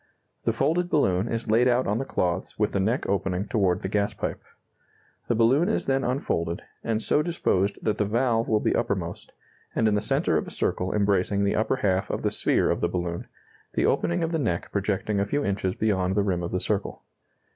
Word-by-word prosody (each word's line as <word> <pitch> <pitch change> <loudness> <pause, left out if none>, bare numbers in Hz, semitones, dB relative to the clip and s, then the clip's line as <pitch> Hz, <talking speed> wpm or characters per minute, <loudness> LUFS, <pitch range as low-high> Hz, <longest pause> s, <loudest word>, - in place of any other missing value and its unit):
The - - +3
folded 175 +2 +1
balloon 95 - +2
is 115 -1 -2
laid 120 +3 +4
out 125 +1 +2
on 105 +3 0
the 135 - -2
cloths 90 -6 -2
with 105 -1 +1
the 100 - 0
neck 110 +7 0
opening 95 0 -1
toward 95 -5 +1
the - - -2
gas 100 +1 0
pipe. - - -4 0.9
The 120 - +1
balloon 130 - +3
is 220 - 0
then 135 0 +1
unfolded, 85 - -1 0.2
and 115 -1 0
so 150 - +3
disposed 105 - 0
that 110 - 0
the 105 - +2
valve 115 +1 +1
will 110 - +2
be - - +1
uppermost, - - -2 0.4
and 110 - +3
in 105 - +2
the 105 - +1
centre - - +1
of - - -2
a - - -5
circle 90 +1 -1
embracing 100 -1 +1
the 100 - +1
upper 110 +4 +1
half 95 -7 0
of - - -3
the - - +1
sphere - - +2
of - - -1
the 85 - +1
balloon, 85 -1 -3 0.5
the - - +1
opening 170 0 +1
of 165 - -1
the 165 - 0
neck 90 - -2
projecting 100 +1 -1
a 100 - +1
few 145 +7 -1
inches 95 -2 -1
beyond 95 -4 0
the 100 - +2
rim 90 -3 0
of 85 - -4
the 90 - 0
circle. 100 +1 -2
105 Hz, 215 wpm, -26 LUFS, 95-120 Hz, 0.9 s, laid